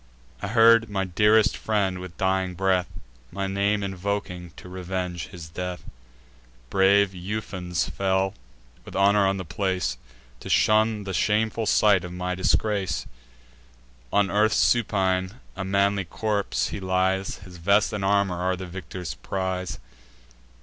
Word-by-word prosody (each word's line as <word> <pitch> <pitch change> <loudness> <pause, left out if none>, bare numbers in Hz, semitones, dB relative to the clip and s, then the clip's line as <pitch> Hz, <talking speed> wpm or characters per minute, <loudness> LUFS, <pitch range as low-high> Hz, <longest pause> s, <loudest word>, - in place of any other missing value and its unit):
I - - -3
heard 115 +1 +5
my 100 -2 -1
dearest 105 +3 +3
friend, 100 -4 -1
with 90 -1 -9
dying 95 -1 0
breath, 95 -1 +1 0.4
My 100 +1 -3
name 100 +1 0
invoking 95 -2 -3
to - - -11
revenge 90 -2 -4
his 85 -3 -10
death. 90 +2 -5 0.9
Brave 100 +1 +4
Ufens 90 -2 -3
fell 95 0 0 0.5
with - - -11
honour 100 +1 +4
on 95 0 0
the 95 - -5
place, 90 -7 -2 0.4
To - - -9
shun 110 0 +3
the 95 -1 -5
shameful 110 +3 +1
sight 100 -3 +4
of 90 - -7
my 90 0 -3
disgrace. 95 0 0 1.1
On 100 -1 +2
earth 105 +2 +3
supine, 95 -5 +2 0.2
a 95 - -4
manly 100 0 +1
corpse 105 +3 -1
he - - -5
lies; 95 0 0
His 95 -2 -13
vest 100 +5 +2
and 105 -2 -3
armour 100 -2 +2
are 90 +1 0
the 95 +1 -7
victor's 90 -3 -6
prize. 90 +8 -3
95 Hz, 135 wpm, -25 LUFS, 90-100 Hz, 1.1 s, heard